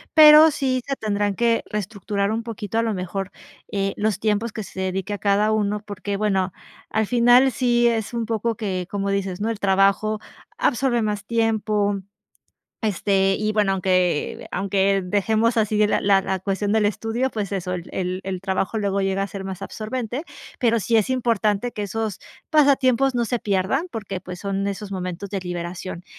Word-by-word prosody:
pero 305 Hz, 0 st, +9 dB
sí 260 Hz, -3 st, -1 dB
se 275 Hz, -, -1 dB
tendrán 205 Hz, -3 st, -1 dB
que 235 Hz, +1 st, +2 dB
reestructurar 200 Hz, 0 st, -2 dB
un 225 Hz, -, -1 dB
poquito, 225 Hz, -1 st, -4 dB
a -, -, +4 dB
lo 225 Hz, -2 st, -1 dB
mejor, 185 Hz, +1 st, -4 dB, 0.4 s
eh, 195 Hz, -2 st, -1 dB
los 210 Hz, -2 st, 0 dB
tiempos 215 Hz, +2 st, 0 dB
que 215 Hz, -, -5 dB
se 190 Hz, -, -9 dB
dedique 190 Hz, +2 st, -2 dB
a 205 Hz, -, -4 dB
cada 205 Hz, +1 st, +2 dB
uno 210 Hz, -1 st, 0 dB
porque 200 Hz, -1 st, -4 dB
bueno, 195 Hz, -3 st, +1 dB, 0.4 s
al 220 Hz, 0 st, +1 dB
final 245 Hz, +3 st, +5 dB
sí 240 Hz, -1 st, +2 dB
es 225 Hz, -3 st, 0 dB
un 230 Hz, -, -1 dB
poco 225 Hz, +1 st, -1 dB
que 185 Hz, -5 st, -3 dB
como 200 Hz, -1 st, -2 dB
dices, 195 Hz, -2 st, -2 dB
¿no?, 220 Hz, +2 st, 0 dB
el 220 Hz, -, -5 dB
trabajo 200 Hz, +2 st, +2 dB, 0.4 s
absorbe 240 Hz, -3 st, +1 dB
más 210 Hz, -1 st, -2 dB
tiempo, 215 Hz, -3 st, +1 dB, 0.8 s
este, 195 Hz, -2 st, +2 dB
y 215 Hz, 0 st, 0 dB
bueno, 210 Hz, -2 st, +2 dB
aunque 185 Hz, -4 st, 0 dB
aunque 195 Hz, +1 st, +1 dB
dejemos 220 Hz, +5 st, +1 dB
así 215 Hz, -1 st, +3 dB
la 210 Hz, -, +1 dB
la 195 Hz, -1 st, +4 dB
la 190 Hz, 0 st, -2 dB
cuestión 195 Hz, +2 st, -1 dB
del 215 Hz, -1 st, +3 dB
estudio, 225 Hz, +5 st, -1 dB
pues 210 Hz, -5 st, -4 dB
eso, 185 Hz, -2 st, -2 dB
el 180 Hz, -1 st, -6 dB
el 185 Hz, 0 st, -3 dB
el 190 Hz, -1 st, -3 dB
trabajo 190 Hz, +2 st, -1 dB
luego 200 Hz, -2 st, 0 dB
llega 195 Hz, 0 st, 0 dB
a 195 Hz, -, -1 dB
ser 195 Hz, -1 st, -7 dB
más 190 Hz, -1 st, -6 dB
absorbente, 240 Hz, +6 st, -4 dB, 0.4 s
pero 230 Hz, -3 st, +3 dB
sí 230 Hz, +3 st, 0 dB
es 220 Hz, +2 st, +3 dB
importante 230 Hz, -2 st, 0 dB
que 210 Hz, -, -4 dB
esos 210 Hz, 0 st, -3 dB, 0.3 s
pasatiempos 270 Hz, -4 st, +3 dB
no 235 Hz, -, +1 dB
se 245 Hz, +1 st, -1 dB
pierdan 210 Hz, -, 0 dB
porque, 195 Hz, -4 st, -5 dB
pues, 180 Hz, -1 st, -8 dB
son 195 Hz, 0 st, -2 dB
esos 200 Hz, 0 st, -4 dB
momentos 185 Hz, +1 st, -5 dB
de 195 Hz, -1 st, -3 dB
liberación, 175 Hz, 0 st, -5 dB
205 Hz, 180 wpm, -23 LUFS, 195-225 Hz, 0.8 s, pero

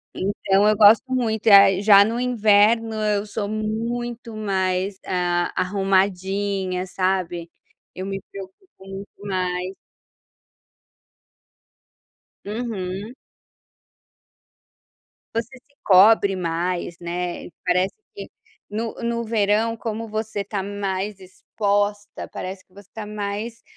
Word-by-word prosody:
Então, 195 Hz, +1 st, +1 dB
eu 215 Hz, 0 st, +3 dB
gosto 220 Hz, +5 st, +6 dB
muito. 225 Hz, -3 st, -1 dB
Ah, 195 Hz, -2 st, +8 dB
já 200 Hz, -1 st, +7 dB
no 230 Hz, +2 st, -2 dB
inverno 225 Hz, -2 st, +3 dB
eu 210 Hz, -1 st, 0 dB
sou 205 Hz, -1 st, -4 dB
muito 230 Hz, +2 st, -3 dB
mais, 190 Hz, -2 st, -1 dB
ah, 175 Hz, -1 st, 0 dB
arrumadinha, 195 Hz, 0 st, 0 dB
sabe. 185 Hz, -2 st, -2 dB, 0.5 s
Eu 185 Hz, -, -5 dB
me 195 Hz, 0 st, -4 dB
preocupo 195 Hz, -, -10 dB, 0.2 s
muito 195 Hz, +1 st, -8 dB, 0.2 s
mais. 185 Hz, -1 st, -2 dB, 2.7 s
Uhum. 205 Hz, -1 st, -4 dB, 2.2 s
Você 235 Hz, +3 st, -3 dB
se 280 Hz, +3 st, -26 dB
cobre 200 Hz, +1 st, +6 dB
mais, 175 Hz, 0 st, -2 dB
né. 175 Hz, 0 st, -4 dB, 0.2 s
Parece 180 Hz, +1 st, +1 dB, 0.2 s
que 405 Hz, -, -7 dB, 0.4 s
no 220 Hz, +2 st, -3 dB
no 235 Hz, 0 st, -1 dB
verão, 220 Hz, 0 st, +1 dB
como 225 Hz, 0 st, -5 dB
você 215 Hz, -1 st, -3 dB
está 200 Hz, 0 st, -3 dB
mais 200 Hz, 0 st, -3 dB
exposta, 205 Hz, +2 st, -2 dB
parece 185 Hz, +1 st, -7 dB
que 185 Hz, -, -32 dB
você 200 Hz, 0 st, -15 dB
está 215 Hz, +1 st, -8 dB
mais, 210 Hz, +2 st, -5 dB
200 Hz, 105 wpm, -22 LUFS, 185-220 Hz, 2.7 s, Ah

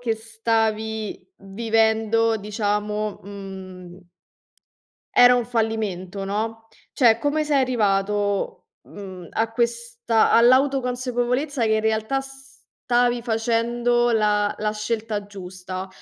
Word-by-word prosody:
che 230 Hz, -2 st, 0 dB
stavi 220 Hz, -, -2 dB
vivendo, 225 Hz, +2 st, +1 dB
diciamo, 210 Hz, 0 st, -2 dB
mhmm 190 Hz, -2 st, -10 dB, 1.1 s
era 245 Hz, 0 st, +8 dB
un 245 Hz, -, 0 dB
fallimento, 210 Hz, -5 st, -2 dB
no, 225 Hz, +2 st, -3 dB, 0.3 s
cioè, 235 Hz, -4 st, +4 dB
come 290 Hz, +4 st, 0 dB
sei 295 Hz, -2 st, +2 dB
arrivato, 205 Hz, -4 st, 0 dB, 0.2 s
mhmm, 185 Hz, -4 st, -10 dB
a 225 Hz, 0 st, -1 dB
questa 235 Hz, -1 st, 0 dB
all'autoconsapevolezza 250 Hz, +1 st, +2 dB
che 220 Hz, -, +2 dB
in 215 Hz, -, +2 dB
realtà 220 Hz, +4 st, 0 dB
stavi 250 Hz, -2 st, -2 dB
facendo 240 Hz, +1 st, +1 dB
la 210 Hz, -2 st, +2 dB
la 210 Hz, 0 st, -1 dB
scelta 215 Hz, -1 st, -3 dB
giusta? 185 Hz, -1 st, -7 dB
225 Hz, 95 wpm, -23 LUFS, 205-240 Hz, 1.1 s, era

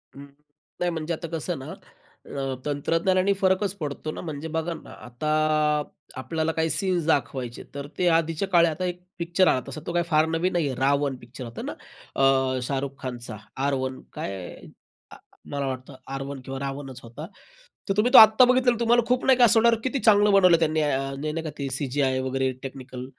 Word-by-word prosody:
अं, 140 Hz, +1 st, -10 dB, 0.5 s
नाही 180 Hz, -, +1 dB
म्हणजे 165 Hz, 0 st, -3 dB
आता 165 Hz, +1 st, -5 dB
कसं 165 Hz, +2 st, -3 dB
ना, 130 Hz, -, -8 dB, 0.5 s
अ, 135 Hz, -1 st, -4 dB
तंत्रज्ञानाने 170 Hz, +7 st, +1 dB
फरकच 190 Hz, +1 st, +2 dB
पडतो 150 Hz, +1 st, -4 dB
ना. -, -, -7 dB
म्हणजे 155 Hz, -1 st, -6 dB
बघा 165 Hz, +1 st, -1 dB
ना, -, -, -11 dB, 0.2 s
आता 120 Hz, +6 st, -6 dB, 0.9 s
आपल्याला 160 Hz, +5 st, -2 dB
काही 160 Hz, 0 st, 0 dB
सीन्स 180 Hz, -4 st, 0 dB
दाखवायचे 130 Hz, -5 st, -1 dB
तर 140 Hz, 0 st, -5 dB
ते 180 Hz, -, +2 dB
आधीच्या 165 Hz, +3 st, -2 dB
काळी, 170 Hz, -2 st, +5 dB
आता 175 Hz, +3 st, -2 dB
एक 180 Hz, 0 st, -4 dB, 0.2 s
पिक्चर 175 Hz, +2 st, +2 dB
आला 130 Hz, -, +3 dB
असा, 150 Hz, +3 st, -7 dB
तो 170 Hz, -, -3 dB
काही 175 Hz, 0 st, +2 dB
फार 155 Hz, 0 st, +4 dB
नवीन 165 Hz, +3 st, 0 dB
नाहीये. 150 Hz, -6 st, 0 dB
रावण 140 Hz, +1 st, +1 dB
पिक्चर 125 Hz, +2 st, -11 dB
होता 115 Hz, -, -8 dB
ना, -, -, -5 dB, 0.5 s
अ, 130 Hz, -1 st, +3 dB
शाहरुख 140 Hz, 0 st, -2 dB
खानचा 120 Hz, -4 st, -6 dB, 0.3 s
आर. 140 Hz, -, +1 dB
वन 130 Hz, 0 st, -2 dB
काय, 95 Hz, -2 st, -6 dB, 1.0 s
मला 140 Hz, -1 st, -2 dB
वाटतं 130 Hz, +1 st, -6 dB, 0.2 s
आर 135 Hz, -, -3 dB
वन 140 Hz, -1 st, -6 dB
किंवा 135 Hz, 0 st, -5 dB
रावणच 135 Hz, -2 st, -6 dB
होता. 120 Hz, +7 st, -9 dB, 0.6 s
तर -, -, +3 dB
तुम्ही 240 Hz, +4 st, +3 dB
तो -, -, +10 dB
आत्ता 220 Hz, +3 st, +9 dB
बघितलात 255 Hz, -1 st, +3 dB
तर 235 Hz, -, -6 dB
तुम्हाला 240 Hz, +1 st, +4 dB
खूप 250 Hz, 0 st, +1 dB
नाही 265 Hz, -1 st, +5 dB
का, 245 Hz, -, +7 dB, 0.4 s
किती 265 Hz, +1 st, -1 dB
चांगलं 210 Hz, -2 st, +5 dB
बनवलं 180 Hz, -4 st, +6 dB
त्यांनी, 155 Hz, -1 st, +1 dB, 0.5 s
नाही 165 Hz, 0 st, -3 dB
का. 155 Hz, -, -4 dB
ते 140 Hz, -, -3 dB
अ, -, -, -6 dB
सीजीआय 130 Hz, 0 st, 0 dB
वगैरे 130 Hz, 0 st, -1 dB
टेक्निकल 130 Hz, -1 st, -7 dB
155 Hz, 185 wpm, -25 LUFS, 135-180 Hz, 1.0 s, तो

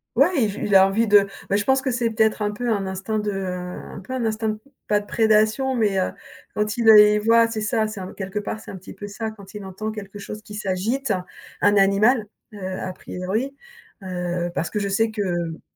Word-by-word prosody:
Ouais, 280 Hz, +2 st, +4 dB
il -, -, +3 dB
v 200 Hz, -, -6 dB
il 205 Hz, -, +2 dB
a 190 Hz, 0 st, +8 dB
envie 215 Hz, +4 st, +1 dB
de 205 Hz, -1 st, +6 dB, 0.2 s
beh, 195 Hz, -, +2 dB
je 205 Hz, -, +1 dB
pense 265 Hz, +2 st, +3 dB
que 265 Hz, -, -1 dB
c'est 240 Hz, -2 st, 0 dB
peut-être 220 Hz, -1 st, +1 dB
un 210 Hz, 0 st, 0 dB
peu 240 Hz, +4 st, -3 dB
un 200 Hz, -3 st, 0 dB
instinct 190 Hz, +3 st, -3 dB
de 210 Hz, -1 st, -2 dB
un 180 Hz, -1 st, -5 dB
peu 195 Hz, -, -11 dB
un 250 Hz, -3 st, -1 dB
instinct, 220 Hz, -1 st, -1 dB, 0.3 s
pas 210 Hz, 0 st, +4 dB
de 205 Hz, -, -10 dB
prédation 220 Hz, +5 st, +2 dB
mais, 215 Hz, -5 st, +1 dB
heu, 185 Hz, -, -1 dB, 0.4 s
quand 210 Hz, 0 st, -1 dB
il, 230 Hz, -2 st, +3 dB
heu, 220 Hz, -, +10 dB
les 210 Hz, 0 st, +7 dB
voit 230 Hz, +2 st, +5 dB
c'est 220 Hz, -1 st, -3 dB
ça, 220 Hz, 0 st, +1 dB
c'est 215 Hz, -2 st, -7 dB
un 185 Hz, -, -7 dB
quelque 195 Hz, +1 st, -4 dB
part 210 Hz, +1 st, -4 dB
c'est -, -, -10 dB
un -, -, -7 dB
petit 190 Hz, 0 st, -10 dB
peu 205 Hz, -, -8 dB
ça, 220 Hz, +2 st, -4 dB
quand 200 Hz, -2 st, -14 dB
il 205 Hz, -1 st, -7 dB
entend 195 Hz, +3 st, -5 dB
quelque 205 Hz, -2 st, -8 dB
chose 210 Hz, +1 st, -7 dB
qui 210 Hz, -, -12 dB
s'agite, 210 Hz, +5 st, -1 dB, 0.5 s
un 205 Hz, 0 st, +4 dB
animal, 210 Hz, +4 st, +4 dB, 0.3 s
heu, 205 Hz, -, -9 dB
a 185 Hz, 0 st, -4 dB
priori, 195 Hz, +9 st, -4 dB, 0.5 s
heu, 175 Hz, -1 st, -3 dB
parce 170 Hz, -, -2 dB
que 210 Hz, -, -2 dB
je 200 Hz, -1 st, -2 dB
sais 220 Hz, +3 st, +1 dB
que, 215 Hz, -1 st, -3 dB
heu 175 Hz, -4 st, -2 dB
210 Hz, 235 wpm, -23 LUFS, 195-220 Hz, 0.5 s, heu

